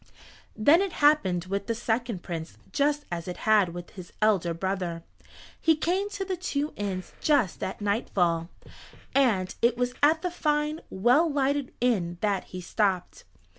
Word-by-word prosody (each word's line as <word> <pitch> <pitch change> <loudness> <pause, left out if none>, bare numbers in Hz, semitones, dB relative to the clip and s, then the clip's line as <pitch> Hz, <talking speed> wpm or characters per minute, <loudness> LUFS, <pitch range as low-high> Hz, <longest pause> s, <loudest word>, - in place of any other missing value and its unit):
Then 290 - +5
it 390 -3 -2
happened 190 - +3
with 195 +1 -3
the 230 - 0
second 230 -4 -2
Prince 165 -2 -6
just 290 +1 +1
as 170 0 -4
it 180 - -5
had 215 -4 +5
with 175 0 -8
his 185 -2 -11
elder 200 -5 +2
brother. 175 -1 -3 0.6
He 325 -1 +4
came 365 +6 0
to 405 -1 -4
the 375 -1 -2
two 300 -4 -2
inns 190 -3 -4
just 280 - +2
at 190 - -4
nightfall, 175 -5 0 0.6
and 220 -10 +2
it 235 0 +3
was 250 0 0
at 315 +3 +4
the 360 - -1
fine 300 -1 0
well 250 - +3
lighted 280 -1 0
inn 185 -9 +1
that 200 -3 0
he 185 - -8
stopped. 185 -1 -1
220 Hz, 160 wpm, -27 LUFS, 185-295 Hz, 0.6 s, Then